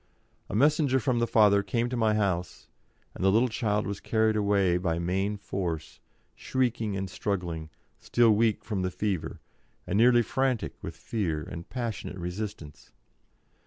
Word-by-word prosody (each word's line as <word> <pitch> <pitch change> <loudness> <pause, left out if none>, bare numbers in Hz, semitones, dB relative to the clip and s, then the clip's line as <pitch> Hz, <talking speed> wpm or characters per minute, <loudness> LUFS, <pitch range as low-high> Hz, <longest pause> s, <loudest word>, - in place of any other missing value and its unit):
A - - -4
messenger 140 +1 +3
from 120 0 0
the 120 - +1
father 105 -3 +5
came 120 +3 -1
to 125 - -3
my 110 -2 +2
house, 95 -4 -2 0.5
and - - -6
the 95 - +5
little 115 +5 +3
child 105 -2 0
was 100 -1 -4
carried 110 -1 +1
away 100 -4 +2
by 85 -2 -1
main 95 +4 -1
force, 85 -6 -4 0.3
shrieking 115 -6 -1
and 95 0 -3
struggling, 90 -5 -3 0.3
still 120 -2 +3
weak 110 0 +2
from 105 -4 -2
the 90 - 0
fever, 95 -2 -3 0.4
and 100 - -1
nearly 120 0 +6
frantic 130 +1 -1
with - - -6
fear 85 -9 -2
and 85 +2 -8
passionate 115 -6 -4
resistance. 90 -3 -6
105 Hz, 155 wpm, -28 LUFS, 90-115 Hz, 0.5 s, nearly